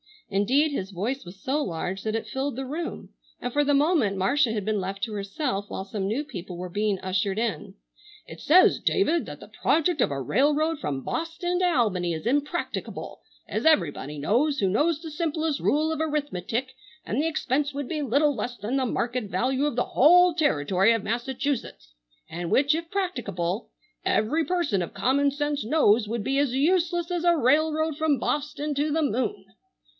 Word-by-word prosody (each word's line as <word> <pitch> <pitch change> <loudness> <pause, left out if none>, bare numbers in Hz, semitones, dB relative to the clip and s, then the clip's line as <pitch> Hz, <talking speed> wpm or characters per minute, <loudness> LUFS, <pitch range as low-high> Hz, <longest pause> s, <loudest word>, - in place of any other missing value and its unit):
Indeed 255 +10 +2
his 195 -8 -4
voice 220 +8 -3
was 180 +2 -12
so 285 +3 0
large 185 - -3
that 220 0 -1
it 225 - -2
filled 265 +5 -3
the 265 +1 -4
room, 320 +5 -5 0.3
and 245 - -3
for 290 0 +2
the 290 - +2
moment 285 - +2
Marcia 240 +5 +2
had 210 -2 -2
been 215 -1 0
left 195 +2 -4
to 225 -3 -2
herself 200 +1 -3
while - - -4
some 195 0 -4
new 235 +8 -1
people 180 - -8
were 180 +1 -5
being 205 +2 0
ushered 190 +1 -1
in. 220 -9 -2 0.5
"It 160 - -11
says, 360 +5 +5
David, 340 -4 +1
that - - -9
'the - - -12
project 325 0 +2
of - - +3
a 140 -1 -3
railroad 295 - +1
from 135 -3 -3
Bawston 350 +2 -2
to 365 - +2
Albany 210 - +1
is 160 +4 -6
impracticable 290 +7 -2 0.3
as - - -3
everybody 155 - +2
knows 250 - +1
who 195 -5 +1
knows 300 - +1
the 320 -2 -7
simplest 315 -1 -1
rule 310 +2 +1
of 320 - -3
arithmetic, 265 - -2 0.3
and 240 +7 -1
the 320 - +1
expense 285 -2 -1
would 280 -2 -4
be 310 -2 -2
little 285 +3 +2
less 245 -2 -4
than 220 +7 -2
the 265 - +1
market 240 0 -1
value 260 +7 0
of 295 - -1
the 245 - +2
whole 355 +5 +5
territory 195 - +2
of 225 -3 -1
Massachusetts; 235 - -3 0.4
and 170 +1 -4
which, 280 - +3
if 330 +1 -3
practicable, 220 - -2 0.4
every 300 +10 +1
person 340 - 0
of 170 - -5
common 280 +3 +2
sense 290 -3 -2
knows 230 -5 +3
would 225 0 -3
be 270 +4 0
as 275 -3 +1
useless 345 +3 +1
as 350 -1 -1
a 345 -1 +5
railroad 310 +3 +2
from 310 -3 +2
Bawston 295 +3 -2
to 295 +2 0
the 320 +1 +1
moon. 250 -4 -1
265 Hz, 185 wpm, -26 LUFS, 205-305 Hz, 0.5 s, says